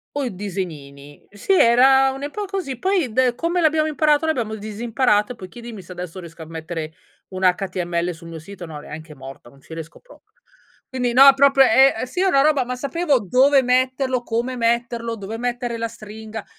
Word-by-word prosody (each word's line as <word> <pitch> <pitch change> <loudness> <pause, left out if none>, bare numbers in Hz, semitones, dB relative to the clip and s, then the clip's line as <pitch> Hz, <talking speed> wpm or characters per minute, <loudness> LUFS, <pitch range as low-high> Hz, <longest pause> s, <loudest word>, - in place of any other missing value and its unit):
O 290 - -1
i 245 - -4
disegnini. 150 -8 -7
Sì 205 - -1
era 265 +3 +5
un'epo 290 +10 -5
così, 370 -10 -4
poi 370 - 0
de 255 +2 +2
come 335 +8 -1
l'abbiamo 310 -1 +2
imparato 305 0 +2
l'abbiamo 240 -9 -1
disimparato 220 +1 0
e - - -7
poi 185 - -10
chiedimi 230 -1 -10
se 185 - -14
adesso 180 0 -7
riesco 165 -2 -11
a - - -11
mettere 160 0 -6 0.4
un 185 -1 -7
HTML 180 -2 0
sul 165 +1 -13
mio 165 - -8
sito, 175 +1 -10
no 150 -2 -8
neanche 155 +1 -10
morta, 135 -2 -12
non 135 +2 -21
ci 160 - -13
riesco 165 0 -9
proprio. - - -21 0.5
Quindi 250 -2 -2
no, 275 +2 +8
proprio 275 0 +5
è 270 +1 +5
è 225 - -3
sì, 255 +9 -4
è - - +2
una 340 -8 +4
roba, 290 -2 +3
ma 250 +1 -5
sapevo 280 +2 0
dove 265 +7 +3
metterlo, 255 0 +1
come 240 +2 -3
metterlo, 235 -1 -1
dove 205 +3 -7
mettere 245 -1 -3
la 230 0 -2
stringa. 220 -1 -9
235 Hz, 190 wpm, -21 LUFS, 185-270 Hz, 0.5 s, no